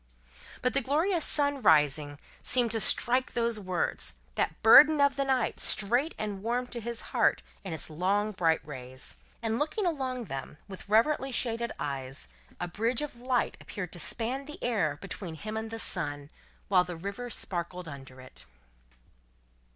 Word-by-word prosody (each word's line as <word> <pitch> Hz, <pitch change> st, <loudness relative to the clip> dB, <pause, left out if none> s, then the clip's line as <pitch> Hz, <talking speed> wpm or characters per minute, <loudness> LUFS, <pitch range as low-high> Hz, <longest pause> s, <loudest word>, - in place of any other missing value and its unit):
But, 250 Hz, -, +2 dB
the 275 Hz, -, +4 dB
glorious 320 Hz, +6 st, +1 dB
sun, 285 Hz, -2 st, +2 dB
rising, 150 Hz, -, +3 dB, 0.2 s
seemed 245 Hz, -3 st, +3 dB
to 225 Hz, -, 0 dB
strike 245 Hz, +4 st, +4 dB
those 235 Hz, -2 st, 0 dB
words, 185 Hz, -, -2 dB, 0.2 s
that -, -, -2 dB
burden 295 Hz, +7 st, +9 dB
of 280 Hz, 0 st, +4 dB
the 275 Hz, -, 0 dB
night, 260 Hz, -4 st, 0 dB
straight 245 Hz, +10 st, +2 dB
and 205 Hz, -2 st, -4 dB
warm 240 Hz, +3 st, -1 dB
to 240 Hz, -, -6 dB
his 235 Hz, +1 st, -4 dB
heart -, -, +3 dB, 0.2 s
in 190 Hz, -, -6 dB
its 160 Hz, -, -3 dB
long 195 Hz, +7 st, 0 dB
bright 165 Hz, -5 st, +1 dB
rays. 130 Hz, -3 st, -7 dB, 0.2 s
And 225 Hz, 0 st, 0 dB
looking 315 Hz, +8 st, -1 dB
along 260 Hz, -7 st, -2 dB
them, 135 Hz, -, -7 dB
with 195 Hz, 0 st, -10 dB
reverently 265 Hz, +5 st, +3 dB
shaded 235 Hz, -2 st, 0 dB
eyes, 135 Hz, -, -5 dB, 0.3 s
a -, -, -2 dB
bridge 230 Hz, +9 st, 0 dB
of 290 Hz, -5 st, -6 dB
light 245 Hz, 0 st, -1 dB
appeared 180 Hz, -4 st, -6 dB
to 175 Hz, -, -5 dB
span 250 Hz, -, -1 dB
the 300 Hz, -, -8 dB
air 180 Hz, -12 st, 0 dB
between 185 Hz, -3 st, -6 dB
him 215 Hz, +7 st, -6 dB
and 220 Hz, 0 st, -3 dB
the 225 Hz, -, -5 dB
sun, 145 Hz, -9 st, -1 dB, 0.4 s
while 185 Hz, -2 st, +4 dB
the 180 Hz, -2 st, -7 dB
river 200 Hz, +8 st, -5 dB
sparkled 180 Hz, -4 st, -3 dB
under 135 Hz, -3 st, -10 dB
it. 130 Hz, 0 st, -9 dB
215 Hz, 165 wpm, -29 LUFS, 170-250 Hz, 0.4 s, burden